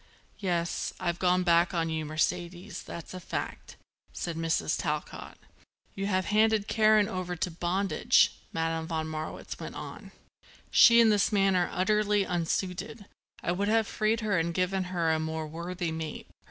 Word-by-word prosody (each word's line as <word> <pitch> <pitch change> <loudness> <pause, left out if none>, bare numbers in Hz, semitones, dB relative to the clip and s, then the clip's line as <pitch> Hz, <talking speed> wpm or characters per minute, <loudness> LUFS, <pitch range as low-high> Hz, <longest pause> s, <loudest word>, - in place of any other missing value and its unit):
"Yes, 175 -4 -1
I've 175 -2 -2
gone 180 0 +3
back 170 +1 +3
on 165 -1 0
you, 160 -1 -2
Mercedes, 175 +5 -2
that's 170 +1 -8
a 185 - -6
fact," 180 - -5 0.4
said 170 -2 -4
Mrs. 165 0 0
Talcott. - - -4 0.6
"You 195 0 -3
have 185 -2 +1
handed 215 -1 +3
Karen 215 -1 +4
over 180 -1 -4
to 175 +1 -2
bondage," 190 +7 +2 0.2
Madame 165 0 -2
von 160 -2 -2
Marwitz 155 0 -6
went - - -7
on. - - -8 0.6
"She 235 -1 +8
and 225 -1 +5
this 205 0 +2
man 195 -2 +3
are 180 -1 +2
utterly 210 +2 +2
unsuited. 185 +5 -2 0.4
I - - 0
would 200 +3 -1
have 225 +1 +3
freed 215 +2 0
her 205 -5 +1
and 170 +1 -2
given 185 +1 0
her 175 -3 0
to 160 - +2
a - - -3
more 160 0 -3
worthy 170 +2 -4
mate." 160 -1 -5
180 Hz, 165 wpm, -29 LUFS, 165-200 Hz, 0.6 s, She